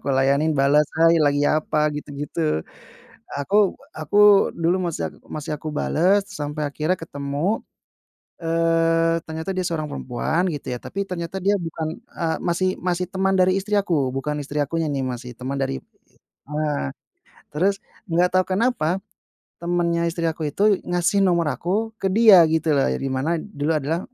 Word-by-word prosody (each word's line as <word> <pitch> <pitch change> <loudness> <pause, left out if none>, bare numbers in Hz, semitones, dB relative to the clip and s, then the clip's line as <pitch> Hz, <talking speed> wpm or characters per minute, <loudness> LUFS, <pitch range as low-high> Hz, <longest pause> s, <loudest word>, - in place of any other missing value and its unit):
aku 140 - -5
layanin, 140 +3 +2
bales, 140 +2 +5 0.2
"Hai, 165 0 +5
lagi 145 0 +2
apa?" 155 0 +1
gitu-gitu. 145 - -3 0.7
Aku 195 +8 +2 0.2
aku 205 - -3 0.4
dulu 175 +2 +1
masih 165 - -3 0.2
masih 155 +1 -5
aku - - -8
bales, 180 +6 +2
sampai 150 -4 -4
akhirnya 150 +4 -1
ketemu, 145 +4 -2 0.8
eee, 165 0 +2
ternyata 160 +3 -5
dia 185 -1 -1
seorang 155 -3 -3
perempuan, 150 +8 -1
gitu 145 - -6
ya, 125 - -3
tapi 195 +10 -4
ternyata 180 -1 -5
dia 200 +2 +2
bukan, 160 -2 -4
eee, 165 -1 -3
masih 175 +2 0
masih 180 0 -2
teman 190 0 +1
dari 185 0 +3
istri 205 +2 -3
aku, 160 -10 +1
bukan 150 +2 -2
istri 145 +1 -2
akunya 165 +3 -1
nih, 140 -3 -1
masih 125 -1 -5
teman 130 +3 -4
dari 70 - -2 0.7
nah, 150 - -2 0.6
terus 195 +6 +1 0.3
nggak 175 +2 +3
tahu 185 - +4
kenapa, 195 -7 +1 0.6
temennya 170 -1 0 0.3
aku 160 - -8
itu 170 - -3 0.2
ngasih 175 +3 +1
nomor 170 -3 +2
aku 200 - -1
ke - - -1
dia, 205 -5 +8
gitu 160 0 +1
loh, 135 - +3
dari 135 - -2
mana 145 +6 0
dulu 160 -6 -2
adalah 155 +3 -1
165 Hz, 150 wpm, -22 LUFS, 145-180 Hz, 0.8 s, dia